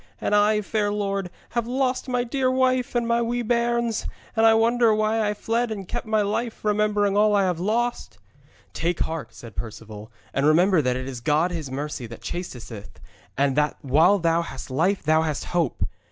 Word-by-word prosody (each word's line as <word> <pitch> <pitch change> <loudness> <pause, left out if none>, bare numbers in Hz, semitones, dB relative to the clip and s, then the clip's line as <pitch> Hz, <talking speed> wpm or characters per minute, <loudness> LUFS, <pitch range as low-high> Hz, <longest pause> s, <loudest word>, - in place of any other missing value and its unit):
And - - -1
I, 210 +1 +4
fair 205 0 -1
lord, 200 -2 -2 0.2
have 235 -1 -2
lost 260 +1 -1
my 250 -1 +1
dear 255 +2 0
wife 255 -1 +1
and 240 -1 +1
my 235 0 +2
wee 240 +1 -1
bairns, 235 -1 0 0.3
and 225 0 +5
I 225 - +6
wonder 230 0 +3
why 215 0 +1
I 210 - -2
fled 230 +3 -1
and 200 -4 -5
kept - - -4
my 215 -1 +2
life, 220 +2 -3
remembering 210 -1 +2
all 210 0 +4
I 200 - +3
have 180 -3 0
lost.' 235 +6 -1 0.6
'Take 170 0 -1
heart,' 160 -6 -3
said 115 -2 -11
Perceval, 110 -1 -8 0.2
'and 140 +2 +2
remember 175 +2 +4
that 125 -2 0
it 130 +1 -4
is 130 -3 -6
God 155 +7 +2
His 160 -5 -4
mercy 140 -2 -4
that 115 0 -11
chastiseth, 125 - -7 0.4
and 140 -1 +2
that 150 0 +1
while 160 +9 +4
thou 170 -2 +2
hast 135 -5 -8
life 180 +9 +1
thou 155 +1 +3
hast 155 -2 -2
hope. 170 -7 -1
205 Hz, 190 wpm, -24 LUFS, 155-230 Hz, 0.6 s, I